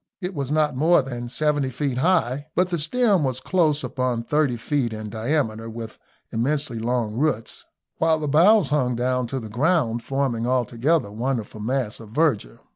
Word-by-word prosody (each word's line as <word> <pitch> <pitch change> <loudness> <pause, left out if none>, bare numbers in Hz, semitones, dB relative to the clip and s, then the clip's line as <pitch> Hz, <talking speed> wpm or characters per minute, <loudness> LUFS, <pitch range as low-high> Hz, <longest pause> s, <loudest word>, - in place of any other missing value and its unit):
It 185 0 -4
was 140 -4 -3
not 150 -3 +2
more 155 +2 +4
than 120 -2 -6
seventy 145 +1 0
feet 130 0 -2
high, 145 -4 +1
but 180 +1 +2
the 170 - 0
stem 200 +2 +2
was 130 -2 -1
close 155 -1 +1
upon 125 -3 -1
thirty 145 -1 +1
feet 120 0 -1
in 110 -1 -6
diameter, 115 -2 -1
with 115 -1 -8 0.3
immensely 130 +1 -1
long 115 -1 -1
roots, 130 -6 -2 0.3
while 160 0 +3
the 155 -1 -3
boughs 170 +4 +5
hung 130 -4 +1
down 125 +1 0
to 135 +3 -3
the 110 - -7
ground, 120 - +1
forming 130 -3 -1
altogether 125 +2 +1
a - - -12
wonderful 115 -2 -3
mass 120 0 -2
of 110 -2 -11
verdure. 115 - 0
130 Hz, 175 wpm, -23 LUFS, 115-150 Hz, 0.3 s, boughs